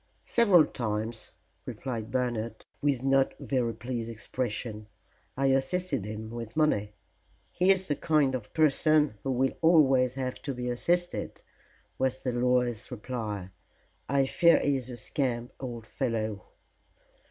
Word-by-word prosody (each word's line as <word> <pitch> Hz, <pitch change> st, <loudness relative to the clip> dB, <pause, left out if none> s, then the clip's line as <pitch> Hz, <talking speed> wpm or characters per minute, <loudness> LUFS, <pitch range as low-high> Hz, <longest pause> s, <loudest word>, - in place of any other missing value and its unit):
"Several 200 Hz, -9 st, +5 dB
times," 110 Hz, -3 st, -4 dB, 0.4 s
replied 115 Hz, -4 st, -5 dB
Bernard, 115 Hz, -3 st, -2 dB, 0.2 s
with 140 Hz, -3 st, +1 dB
no 135 Hz, 0 st, +3 dB
very 120 Hz, -4 st, -1 dB
pleased 115 Hz, 0 st, -4 dB
expression. 110 Hz, -1 st, -4 dB, 0.5 s
"I 135 Hz, -, +1 dB
assisted 135 Hz, -, 0 dB
him 110 Hz, +1 st, -6 dB
with 115 Hz, +2 st, -7 dB
money." 105 Hz, -10 st, +1 dB, 0.6 s
"He 180 Hz, +1 st, +2 dB
is 190 Hz, -1 st, +5 dB
the 145 Hz, -, 0 dB
kind 150 Hz, -4 st, +2 dB
of 115 Hz, -5 st, -5 dB
person 155 Hz, -5 st, +3 dB
who 135 Hz, -, -4 dB
will 130 Hz, +1 st, +1 dB
always 135 Hz, -6 st, +4 dB
have 130 Hz, -1 st, -4 dB
to 140 Hz, -2 st, -4 dB
be 125 Hz, 0 st, -3 dB
assisted," 175 Hz, +8 st, -1 dB, 0.6 s
was 130 Hz, 0 st, 0 dB
the 125 Hz, -, 0 dB
lawyer's 125 Hz, -2 st, +1 dB
reply. 105 Hz, -5 st, -5 dB, 0.6 s
"I 135 Hz, 0 st, +3 dB
fear 170 Hz, +5 st, +5 dB
he 140 Hz, -1 st, +1 dB
is 130 Hz, -1 st, -7 dB
a 125 Hz, -, -7 dB
scamp, 120 Hz, 0 st, -2 dB
old 120 Hz, -4 st, -6 dB
fellow." 110 Hz, -4 st, -2 dB
125 Hz, 135 wpm, -29 LUFS, 115-140 Hz, 0.6 s, Several